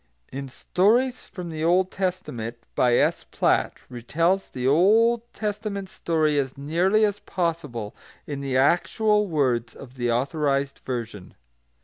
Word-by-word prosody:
[Footnote 135 Hz, -, -5 dB
1: 135 Hz, -, -7 dB
Stories 235 Hz, -, +1 dB
from 180 Hz, -4 st, -7 dB
the 155 Hz, 0 st, -4 dB
Old 180 Hz, +3 st, +3 dB
Testament, 180 Hz, -, -3 dB, 0.2 s
by 125 Hz, -1 st, +3 dB
S. -, -, +2 dB
Platt, -, -, 0 dB
retells 165 Hz, +11 st, -1 dB
the 125 Hz, 0 st, -2 dB
Old 225 Hz, -, +4 dB
Testament 205 Hz, -2 st, -4 dB
story 155 Hz, -4 st, +1 dB
as 135 Hz, -1 st, -3 dB
nearly 175 Hz, +9 st, +2 dB
as 205 Hz, -1 st, -2 dB
possible 150 Hz, -, -3 dB, 0.3 s
in 145 Hz, -2 st, -5 dB
the 135 Hz, -2 st, -1 dB
actual 210 Hz, -, +2 dB
words 125 Hz, -8 st, 0 dB
of 130 Hz, -1 st, -12 dB
the 120 Hz, -1 st, 0 dB
Authorised 140 Hz, +2 st, 0 dB
Version. 115 Hz, -7 st, -6 dB
155 Hz, 135 wpm, -24 LUFS, 130-195 Hz, 0.3 s, Old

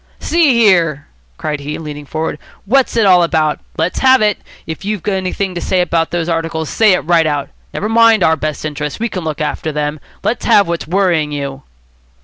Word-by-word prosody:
"See 320 Hz, -6 st, +2 dB
here," 170 Hz, -10 st, +3 dB, 0.3 s
cried 150 Hz, -1 st, -3 dB
he, 145 Hz, +1 st, -5 dB
leaning 150 Hz, -2 st, -8 dB
forward, 155 Hz, 0 st, -3 dB, 0.3 s
"what's 255 Hz, +3 st, +2 dB
it 225 Hz, -, +4 dB
all 180 Hz, -2 st, +6 dB
about? 160 Hz, -3 st, +1 dB, 0.2 s
Let's 165 Hz, +3 st, -1 dB
have 260 Hz, 0 st, +5 dB
it. 210 Hz, -2 st, +1 dB, 0.3 s
If 160 Hz, +3 st, -7 dB
you've 205 Hz, -2 st, -4 dB
anything 190 Hz, -1 st, -2 dB
to 175 Hz, -, -5 dB
say 185 Hz, -, 0 dB
about 165 Hz, -2 st, +1 dB
those 170 Hz, -1 st, -2 dB
articles, 165 Hz, -2 st, -2 dB
say 215 Hz, -3 st, +4 dB
it 180 Hz, -, +1 dB
right 165 Hz, -1 st, +2 dB
out. 145 Hz, -2 st, -2 dB, 0.2 s
Never 210 Hz, -, -3 dB
mind 225 Hz, 0 st, +4 dB
our 160 Hz, -, +4 dB
best 155 Hz, 0 st, -4 dB
interests. 150 Hz, +1 st, -4 dB
We 235 Hz, +1 st, -1 dB
can 185 Hz, -4 st, -5 dB
look 155 Hz, -1 st, -4 dB
after 155 Hz, +1 st, -2 dB
them. 150 Hz, 0 st, -3 dB, 0.2 s
Let's 235 Hz, -, -1 dB
have 200 Hz, -3 st, +4 dB
what's 170 Hz, -2 st, -3 dB
worrying 175 Hz, -4 st, +1 dB
you." 140 Hz, -2 st, -5 dB
165 Hz, 195 wpm, -15 LUFS, 150-200 Hz, 0.3 s, all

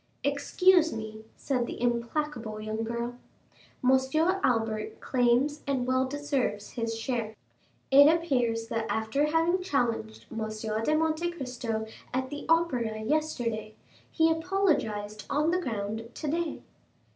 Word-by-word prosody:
"Excuse 325 Hz, +4 st, +4 dB
me," 220 Hz, 0 st, -6 dB
said 250 Hz, -4 st, -1 dB
the -, -, -6 dB
implacable 235 Hz, -1 st, -1 dB
young 215 Hz, +1 st, -3 dB
girl, 235 Hz, +2 st, -4 dB, 0.6 s
"Monsieur 265 Hz, +9 st, +3 dB
Albert 220 Hz, -2 st, 0 dB
claims 255 Hz, +4 st, +2 dB
and 265 Hz, -3 st, 0 dB
well 260 Hz, +1 st, +2 dB
deserves 275 Hz, -7 st, -2 dB
his 230 Hz, -1 st, -3 dB
share. 225 Hz, -2 st, -2 dB, 0.6 s
It 285 Hz, +2 st, +9 dB
appears 245 Hz, -9 st, +1 dB
that 225 Hz, -1 st, -1 dB
after 220 Hz, +7 st, +1 dB
having 330 Hz, +4 st, +2 dB
challenged 230 Hz, -, -1 dB
M. 225 Hz, -1 st, -3 dB, 0.4 s
de 305 Hz, -, +2 dB
Monte 320 Hz, +2 st, +1 dB
Cristo 250 Hz, -8 st, -3 dB, 0.3 s
at 260 Hz, +1 st, -1 dB
the 290 Hz, 0 st, -6 dB
Opera 250 Hz, -10 st, +2 dB
yesterday, 235 Hz, -6 st, -1 dB, 0.3 s
he 325 Hz, 0 st, +3 dB
apologized 315 Hz, -, 0 dB
on 300 Hz, +3 st, +2 dB
the 365 Hz, +1 st, +1 dB
ground 220 Hz, -, -3 dB
today." 325 Hz, +2 st, -2 dB
255 Hz, 120 wpm, -29 LUFS, 225-310 Hz, 0.6 s, It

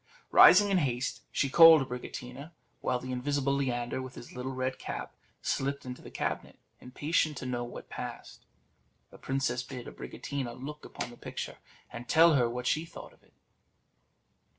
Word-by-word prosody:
Rising 205 Hz, +2 st, +8 dB
in 190 Hz, -, +4 dB
haste, 125 Hz, -4 st, -1 dB
she 140 Hz, -, +1 dB
called 160 Hz, -1 st, +8 dB
Abricotina, 125 Hz, +4 st, -7 dB, 0.3 s
while 125 Hz, -, 0 dB
the 130 Hz, +1 st, -6 dB
invisible 140 Hz, +2 st, 0 dB
Leander, 125 Hz, -2 st, -1 dB
with 130 Hz, 0 st, -8 dB
his 120 Hz, -, -10 dB
little 125 Hz, +1 st, -4 dB
red 130 Hz, 0 st, -3 dB
cap, -, -, -6 dB, 0.3 s
slipped 140 Hz, +1 st, -1 dB
into 125 Hz, 0 st, -7 dB
the -, -, -11 dB
cabinet, -, -, -4 dB, 0.2 s
impatient 150 Hz, +4 st, -1 dB
to -, -, -6 dB
know 120 Hz, -1 st, -2 dB
what 120 Hz, -, -9 dB
passed. -, -, -8 dB, 0.7 s
The -, -, -14 dB
princess 130 Hz, -2 st, -1 dB
bid 125 Hz, -1 st, -8 dB
Abricotina 130 Hz, -5 st, -6 dB
look 150 Hz, +3 st, -8 dB
upon -, -, -6 dB
the 120 Hz, -, -13 dB
picture, -, -, -6 dB, 0.3 s
and 120 Hz, +1 st, -8 dB
tell 165 Hz, +1 st, +6 dB
her 125 Hz, -4 st, +3 dB
what 125 Hz, +1 st, -5 dB
she 155 Hz, +5 st, +1 dB
thought 165 Hz, -, -11 dB
of -, -, -26 dB
it. -, -, -29 dB
130 Hz, 165 wpm, -30 LUFS, 125-145 Hz, 0.7 s, Rising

